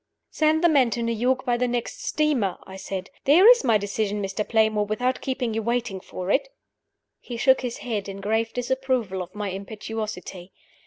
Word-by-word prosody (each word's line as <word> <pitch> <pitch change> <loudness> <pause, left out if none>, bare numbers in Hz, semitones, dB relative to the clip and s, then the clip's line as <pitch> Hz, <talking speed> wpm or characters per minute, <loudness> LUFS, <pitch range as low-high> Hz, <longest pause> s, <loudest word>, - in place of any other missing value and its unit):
"Send 315 +1 +2
the - - +7
man 275 -7 +4
to 235 +1 -2
New 230 - 0
York 255 +4 0
by 245 -2 +1
the 250 +1 +1
next 240 -1 -3
steamer," 285 -11 0
I 190 - -11
said. 190 0 -6
"There 335 +9 +7
is 485 0 +7
my 225 -3 +4
decision, 205 0 -2
Mr. 195 +1 -2
Playmore, 220 -1 +2
without 250 +5 -1
keeping 255 -4 -2
you 225 - -1
waiting 235 -3 -1
for 185 +1 -5
it!" 290 - +2 0.7
He 240 - -7
shook 265 +2 +4
his 245 -2 -4
head, 210 -5 -3
in 195 0 -7
grave 220 +3 0
disapproval 245 -6 -1
of 180 - -9
my 210 -1 -3
impetuosity. 200 -2 -6
225 Hz, 190 wpm, -24 LUFS, 205-255 Hz, 0.7 s, the